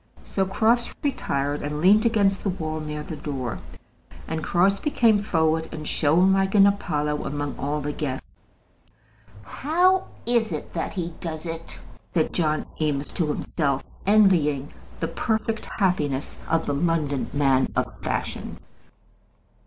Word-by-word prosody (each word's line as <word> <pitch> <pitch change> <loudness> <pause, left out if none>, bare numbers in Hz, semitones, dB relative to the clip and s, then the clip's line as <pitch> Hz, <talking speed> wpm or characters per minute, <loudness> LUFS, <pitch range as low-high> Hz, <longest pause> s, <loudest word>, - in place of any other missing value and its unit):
So 190 -1 -1
Crofts 230 +5 +2
retired 145 - -1
and 150 +1 -3
leaned 210 +7 +5
against 200 -4 +2
the 200 - -1
wall 155 -4 -3
near 150 -1 -5
the 160 - -6
door; 130 -6 -4 0.7
and 160 0 -3
Crosbie 195 - +2
came 225 -7 +4
forward 160 -4 +1
and 155 -1 -6
shone 175 +6 +3
like 195 +1 +1
an 200 -1 +8
Apollo 150 -7 0
among 145 0 -3
all 150 +2 -1
the 145 +1 -2
guests. 135 -4 -4 1.1
"How 360 - +2 0.2
is 235 -2 +1
it - - -6
that - - -3
he 175 -2 -3
does 160 -1 -5
it?" 165 0 -6 0.4
said 160 -2 +1
John 155 -3 0 0.2
Eames 145 -2 0
to 170 -5 -1
himself, 145 -2 -1 0.2
envying 165 -10 +4 0.3
the - - -1
perfect 220 -1 -1
happiness 150 -9 -1
of 165 0 +1
the 145 - -1
London 150 -3 0
man 135 -2 +2
of - - -1
fashion. - - -3
160 Hz, 140 wpm, -25 LUFS, 150-200 Hz, 1.1 s, an